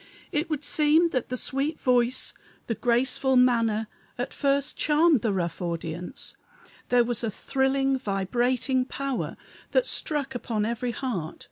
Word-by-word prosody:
It 305 Hz, +3 st, -1 dB
would 300 Hz, -2 st, -2 dB
seem 310 Hz, +4 st, +4 dB
that 255 Hz, -6 st, -2 dB
the 255 Hz, -, -2 dB
sweet 275 Hz, +5 st, -1 dB
voice, 250 Hz, 0 st, +2 dB, 0.3 s
the 230 Hz, -, -1 dB
graceful 250 Hz, +3 st, +1 dB
manner, 230 Hz, -3 st, +3 dB, 0.3 s
at 245 Hz, +2 st, -3 dB
first 280 Hz, 0 st, +1 dB
charmed 305 Hz, -3 st, +3 dB
the 220 Hz, -, +1 dB
rough 175 Hz, -3 st, -2 dB
audience; 170 Hz, 0 st, -4 dB, 0.5 s
there 245 Hz, -1 st, +5 dB
was 235 Hz, 0 st, -1 dB
a 225 Hz, -, 0 dB
thrilling, 270 Hz, +4 st, 0 dB
vibrating 245 Hz, +5 st, 0 dB
power, 275 Hz, 0 st, -3 dB, 0.4 s
that -, -, +4 dB
struck 290 Hz, -, -2 dB
upon 225 Hz, -4 st, -2 dB
every 235 Hz, +2 st, -2 dB
heart. 225 Hz, -, -3 dB
255 Hz, 140 wpm, -26 LUFS, 230-275 Hz, 0.5 s, there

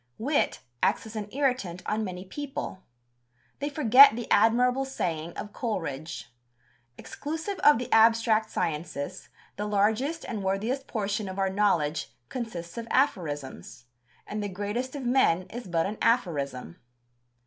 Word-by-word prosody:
Wit 280 Hz, +6 st, 0 dB, 0.2 s
acts -, -, +2 dB
as 220 Hz, 0 st, -10 dB
an 210 Hz, -1 st, -4 dB
irritant 250 Hz, -11 st, -1 dB
on 215 Hz, +1 st, -1 dB
many 185 Hz, -2 st, -5 dB
people. 270 Hz, -4 st, -6 dB, 0.8 s
They 285 Hz, +1 st, -2 dB
forget 275 Hz, -3 st, +7 dB
the 235 Hz, -1 st, -4 dB
admirable 250 Hz, +3 st, +4 dB
saying 170 Hz, -11 st, -3 dB
of 210 Hz, -, -6 dB
Coleridge: 165 Hz, -, -4 dB, 0.6 s
"Exclusive 320 Hz, +7 st, -5 dB
of 295 Hz, -2 st, +6 dB
the 245 Hz, -, -4 dB
abstract 225 Hz, -1 st, +4 dB
sciences, 150 Hz, -5 st, -3 dB, 0.3 s
the 210 Hz, -, -2 dB
largest 220 Hz, +10 st, +1 dB
and 220 Hz, -4 st, -4 dB
worthiest 220 Hz, +8 st, -1 dB
portion 210 Hz, -2 st, -2 dB
of 190 Hz, -, -7 dB
our 195 Hz, -1 st, +1 dB
knowledge 170 Hz, -, +1 dB, 0.2 s
consists 225 Hz, -6 st, -5 dB
of 230 Hz, -, -7 dB
aphorisms; 145 Hz, -, -1 dB, 0.4 s
and 210 Hz, 0 st, -4 dB
the 205 Hz, -, -3 dB
greatest 205 Hz, +8 st, -3 dB
of 280 Hz, -, -5 dB
men 240 Hz, -9 st, +3 dB
is 240 Hz, -2 st, -7 dB
but 165 Hz, -2 st, +1 dB
an 210 Hz, +2 st, -4 dB
aphorism." 140 Hz, -, 0 dB
215 Hz, 135 wpm, -27 LUFS, 180-250 Hz, 0.8 s, forget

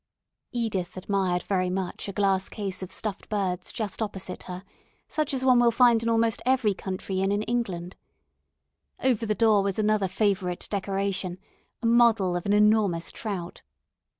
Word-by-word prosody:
Edith 210 Hz, -8 st, -2 dB
admired 185 Hz, -2 st, 0 dB
very 185 Hz, -2 st, 0 dB
much 185 Hz, +1 st, -3 dB
a -, -, -2 dB
glass 195 Hz, -1 st, +1 dB
case 195 Hz, -3 st, -5 dB
of 185 Hz, -, -6 dB
stuffed 210 Hz, -3 st, -4 dB
birds 190 Hz, -4 st, -2 dB
just 215 Hz, -3 st, -4 dB
opposite 190 Hz, -4 st, -4 dB
her, 180 Hz, +1 st, -6 dB, 0.4 s
such 305 Hz, -2 st, -1 dB
as 260 Hz, -1 st, -1 dB
one 255 Hz, -2 st, +6 dB
will 240 Hz, -1 st, +5 dB
find 235 Hz, -1 st, +5 dB
in 230 Hz, -, -1 dB
almost 230 Hz, -1 st, +2 dB
every 250 Hz, -5 st, +2 dB
country 190 Hz, 0 st, -4 dB
inn 195 Hz, +1 st, +1 dB
in 205 Hz, +1 st, 0 dB
England. 190 Hz, -7 st, -3 dB, 1.1 s
Over 235 Hz, -4 st, +2 dB
the 215 Hz, -, +1 dB
door 220 Hz, -3 st, +4 dB
was 195 Hz, -1 st, -1 dB
another 215 Hz, -2 st, +2 dB
favourite 190 Hz, -2 st, 0 dB
decoration, 195 Hz, -2 st, -2 dB, 0.5 s
a -, -, -1 dB
model 230 Hz, -6 st, +4 dB
of 175 Hz, +2 st, -3 dB
an 200 Hz, -, +3 dB
enormous 210 Hz, -5 st, +3 dB
trout. 190 Hz, -6 st, -5 dB
200 Hz, 160 wpm, -26 LUFS, 185-225 Hz, 1.1 s, one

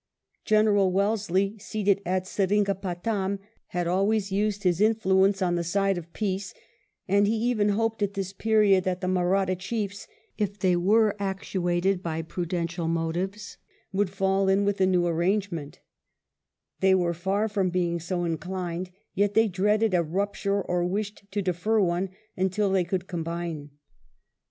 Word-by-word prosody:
General 210 Hz, -3 st, +4 dB
Wellesley, 200 Hz, 0 st, 0 dB
seated 200 Hz, -1 st, 0 dB
at 185 Hz, 0 st, 0 dB
Seringa 200 Hz, +1 st, +1 dB
patam, 195 Hz, +1 st, -2 dB, 0.3 s
had 175 Hz, 0 st, -2 dB
always 195 Hz, +3 st, +1 dB
used 205 Hz, +1 st, 0 dB
his 180 Hz, 0 st, +2 dB
influence 195 Hz, -3 st, +3 dB
on 175 Hz, -1 st, +1 dB
the 175 Hz, 0 st, 0 dB
side 195 Hz, +3 st, +1 dB
of 170 Hz, -1 st, -7 dB
peace; 195 Hz, -1 st, -3 dB, 0.5 s
and 200 Hz, +2 st, +3 dB
he 220 Hz, -, +1 dB
even 220 Hz, -2 st, +1 dB
hoped 225 Hz, +1 st, 0 dB
at 200 Hz, 0 st, -1 dB
this 195 Hz, -1 st, -3 dB
period 210 Hz, -2 st, +3 dB
that 185 Hz, 0 st, -2 dB
the 185 Hz, -, -2 dB
Mahratta 185 Hz, +1 st, +1 dB
chiefs, 200 Hz, +2 st, -4 dB, 0.3 s
if 205 Hz, -1 st, -1 dB
they 185 Hz, -3 st, +2 dB
were 210 Hz, +4 st, +3 dB
actuated 190 Hz, -1 st, -1 dB
by 165 Hz, -2 st, -3 dB
prudential 170 Hz, 0 st, -3 dB
motives, 175 Hz, +5 st, -2 dB, 0.3 s
would 200 Hz, 0 st, +1 dB
fall 195 Hz, 0 st, +1 dB
in 195 Hz, +1 st, +3 dB
with 200 Hz, 0 st, +1 dB
the 190 Hz, -2 st, +3 dB
new 180 Hz, -2 st, +2 dB
arrangement 170 Hz, -2 st, -1 dB, 1.0 s
They 190 Hz, 0 st, +4 dB
were 175 Hz, -2 st, +1 dB
far 190 Hz, +5 st, 0 dB
from 200 Hz, -3 st, 0 dB
being 175 Hz, -1 st, 0 dB
so 175 Hz, +2 st, -2 dB
inclined, 180 Hz, +1 st, -3 dB, 0.2 s
yet 205 Hz, +1 st, +1 dB
they 225 Hz, 0 st, +5 dB
dreaded 210 Hz, +2 st, +1 dB
a 175 Hz, -, +4 dB
rupture 200 Hz, +3 st, -1 dB
or 175 Hz, 0 st, 0 dB
wished 200 Hz, +3 st, -3 dB
to 200 Hz, 0 st, -1 dB
defer 185 Hz, +5 st, +1 dB
one 180 Hz, 0 st, +1 dB, 0.3 s
imtil 190 Hz, +2 st, 0 dB
they 185 Hz, -2 st, +2 dB
could 180 Hz, +1 st, -2 dB
combine. 170 Hz, -4 st, -4 dB
190 Hz, 150 wpm, -26 LUFS, 175-205 Hz, 1.0 s, they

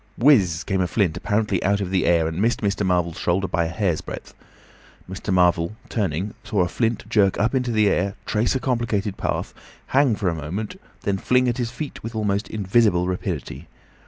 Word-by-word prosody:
Whizz 100 Hz, -, +4 dB
came 95 Hz, -2 st, 0 dB
a 90 Hz, -, +1 dB
flint, 90 Hz, -3 st, +1 dB
apparently 105 Hz, -3 st, 0 dB
out 100 Hz, +2 st, +2 dB
of 95 Hz, -2 st, -3 dB
the 95 Hz, -1 st, +1 dB
air, 85 Hz, -2 st, +3 dB
and 80 Hz, +3 st, -3 dB
missed 115 Hz, +2 st, +1 dB
Mr. 100 Hz, 0 st, 0 dB
Marvel's 90 Hz, -3 st, 0 dB
shoulder 95 Hz, +3 st, +1 dB
by 85 Hz, 0 st, 0 dB
a -, -, -1 dB
hair's 85 Hz, -1 st, -1 dB
breadth. -, -, -8 dB, 0.7 s
Mr. 95 Hz, +2 st, -5 dB
Marvel, 90 Hz, +1 st, +3 dB
turning, 95 Hz, -2 st, -2 dB
saw 100 Hz, -, 0 dB
a 90 Hz, -, +2 dB
flint 115 Hz, +3 st, -1 dB
jerk 105 Hz, -4 st, +3 dB
up 110 Hz, +5 st, +1 dB
into 125 Hz, -2 st, 0 dB
the 110 Hz, -2 st, +3 dB
air, 100 Hz, 0 st, +1 dB
trace 110 Hz, +4 st, +1 dB
a -, -, +1 dB
complicated 115 Hz, -6 st, -1 dB
path, -, -, -3 dB, 0.4 s
hang 135 Hz, -4 st, +4 dB
for 100 Hz, -1 st, -2 dB
a 85 Hz, -, +2 dB
moment, 85 Hz, +8 st, -4 dB
and -, -, -18 dB, 0.2 s
then 100 Hz, -1 st, 0 dB
fling 125 Hz, +3 st, +2 dB
at 120 Hz, +1 st, -1 dB
his 120 Hz, -2 st, -1 dB
feet 140 Hz, +5 st, -6 dB
with 115 Hz, +1 st, -7 dB
almost 105 Hz, -1 st, 0 dB
invisible 100 Hz, -3 st, +2 dB
rapidity. 85 Hz, -4 st, -4 dB
100 Hz, 200 wpm, -23 LUFS, 90-115 Hz, 0.7 s, Whizz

